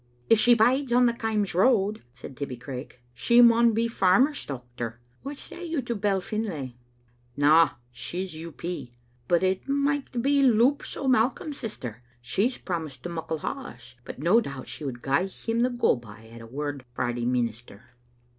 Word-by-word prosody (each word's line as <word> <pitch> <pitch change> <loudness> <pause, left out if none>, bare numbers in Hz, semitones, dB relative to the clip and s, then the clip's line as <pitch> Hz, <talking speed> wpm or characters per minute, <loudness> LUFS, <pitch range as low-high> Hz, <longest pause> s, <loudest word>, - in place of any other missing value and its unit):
"If 225 - +7
she 240 +1 +6
bides 250 +4 +3
on 245 +1 +5
the 235 - +3
Kaims 220 -3 -1
road," 210 +1 +3
said 130 +1 -10
Tibbie 130 -2 -5
Craik, 125 0 -8
" 120 - -37
she 235 0 +5
maun 235 -1 +7
be 230 +1 +2
a - - +1
farmer's 230 +8 +3
dochter. 120 -3 -6 0.3
What 280 +1 -6
say 350 - -8
you 330 -3 -2
to 240 - -2
Bell 200 -2 +1
Finlay?" 180 - -4 0.6
"Na; 155 +3 +5 0.2
she's 180 +7 -5
U. 165 +1 -7
P. 165 -7 -6 0.3
But 175 +1 +2
it 190 +7 0
micht 280 -3 0
be 280 +1 +3
Loups 255 +2 +3
o* 275 - -3
Mai 250 -2 +4
colm's 285 +3 -8
sister. 130 - -7 0.2
She's 200 - 0
promised 160 -8 -5
to 175 - -4
Muckle 160 -2 -4
Haws; 270 -1 -7
but - - -8
no 175 - +4
doubt 140 - -7
she - - -7
would 125 -4 -5
gie 140 +8 +1
him 225 +4 -3
the 250 - +3
go 245 - +2
by 110 -2 -13
at 115 0 -11
a 115 - -10
word 145 +2 -4
frae 120 - -1
the 120 0 -3
minister." 120 -3 -3
185 Hz, 185 wpm, -26 LUFS, -, 0.6 s, If